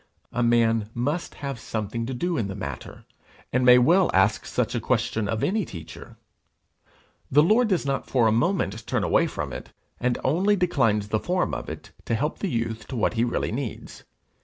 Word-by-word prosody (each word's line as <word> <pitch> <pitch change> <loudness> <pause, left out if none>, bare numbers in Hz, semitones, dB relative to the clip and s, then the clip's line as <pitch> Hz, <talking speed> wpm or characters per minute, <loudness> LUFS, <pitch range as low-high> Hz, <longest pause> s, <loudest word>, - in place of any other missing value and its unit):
A 120 - -1
man 115 -2 +2
must 145 +8 -2
have 135 -4 -4
something 115 +2 -4
to 130 - -3
do 175 +7 -1
in 115 -9 -1
the 95 - -5
matter, 70 -10 -7 0.5
and 125 +1 +2
may 125 0 +8
well 170 +9 +4
ask 95 +3 +2
such - - -1
a - - 0
question 110 -2 0
of 110 +1 -2
any 215 +3 +1
teacher! 85 - -10 1.1
The 150 +3 +5
Lord 220 +8 +4
does 185 -7 0
not 135 0 -2
for 125 -3 +3
a 110 - +4
moment 120 - 0
turn - - 0
away - - +3
from - - -5
it, - - -7 0.3
and 125 0 0
only 185 +9 +2
declines 115 - +1
the 110 - +1
form 180 +7 -1
of - - -4
it - - -8
to 115 - 0
help 150 +7 -2
the 200 - -2
youth 115 -4 -3
to 130 - -6
what 115 - +1
he 115 0 +1
really 120 - -1
needs. 120 -1 -6
120 Hz, 195 wpm, -25 LUFS, 110-160 Hz, 1.1 s, may